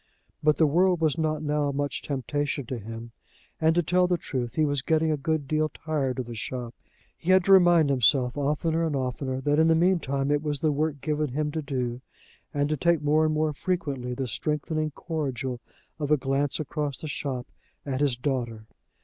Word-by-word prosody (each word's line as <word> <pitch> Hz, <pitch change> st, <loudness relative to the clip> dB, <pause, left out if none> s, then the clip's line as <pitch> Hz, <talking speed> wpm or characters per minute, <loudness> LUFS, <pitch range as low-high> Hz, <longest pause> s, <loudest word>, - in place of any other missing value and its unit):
But 150 Hz, 0 st, +3 dB
the 160 Hz, -, +5 dB
world 175 Hz, +4 st, +3 dB
was 160 Hz, 0 st, +1 dB
not 155 Hz, -1 st, 0 dB
now 145 Hz, -1 st, 0 dB
much 145 Hz, +1 st, -2 dB
temptation 145 Hz, 0 st, -2 dB
to 120 Hz, 0 st, -4 dB
him, 115 Hz, +2 st, -8 dB, 0.5 s
and, 160 Hz, 0 st, +3 dB
to 175 Hz, -, +3 dB
tell 180 Hz, +3 st, +3 dB
the 180 Hz, -1 st, +1 dB
truth, 125 Hz, -6 st, -4 dB
he 155 Hz, -, +3 dB
was 145 Hz, -2 st, 0 dB
getting 160 Hz, +2 st, +2 dB
a -, -, +2 dB
good 150 Hz, 0 st, -1 dB
deal 155 Hz, +1 st, +1 dB
tired 145 Hz, -4 st, -2 dB
of 130 Hz, -, -2 dB
the 120 Hz, -, -7 dB
shop. 120 Hz, +1 st, -5 dB, 0.4 s
He 170 Hz, -, -6 dB
had 185 Hz, 0 st, +6 dB
to 195 Hz, -, +2 dB
remind 175 Hz, -5 st, +6 dB
himself, 125 Hz, -1 st, +3 dB
oftener 150 Hz, +3 st, 0 dB
and 160 Hz, -3 st, 0 dB
oftener, 130 Hz, 0 st, -2 dB
that 145 Hz, +2 st, +2 dB
in 160 Hz, -, +5 dB
the 165 Hz, -, +5 dB
mean 180 Hz, +2 st, +3 dB
time 140 Hz, -1 st, -1 dB
it 145 Hz, 0 st, +2 dB
was 150 Hz, -2 st, -2 dB
the 155 Hz, +1 st, +2 dB
work 145 Hz, -1 st, -1 dB
given 150 Hz, -1 st, -1 dB
him 150 Hz, +1 st, -1 dB
to 160 Hz, +1 st, -2 dB
do, 125 Hz, -3 st, -3 dB, 0.5 s
and 145 Hz, 0 st, 0 dB
to 155 Hz, -, 0 dB
take 170 Hz, 0 st, +2 dB
more 150 Hz, +2 st, +3 dB
and 155 Hz, -, +1 dB
more 155 Hz, 0 st, +1 dB
frequently 140 Hz, -7 st, -2 dB
the 135 Hz, +1 st, -2 dB
strengthening 155 Hz, +3 st, -1 dB
cordial 135 Hz, -6 st, -4 dB, 0.4 s
of 145 Hz, -2 st, -2 dB
a 150 Hz, -, +5 dB
glance 135 Hz, +1 st, 0 dB
across 150 Hz, -2 st, -3 dB
the 155 Hz, -, -7 dB
shop 135 Hz, -4 st, -3 dB, 0.4 s
at 135 Hz, -1 st, -2 dB
his 140 Hz, -4 st, +2 dB
daughter. 120 Hz, -4 st, -2 dB
145 Hz, 205 wpm, -26 LUFS, 135-155 Hz, 0.5 s, had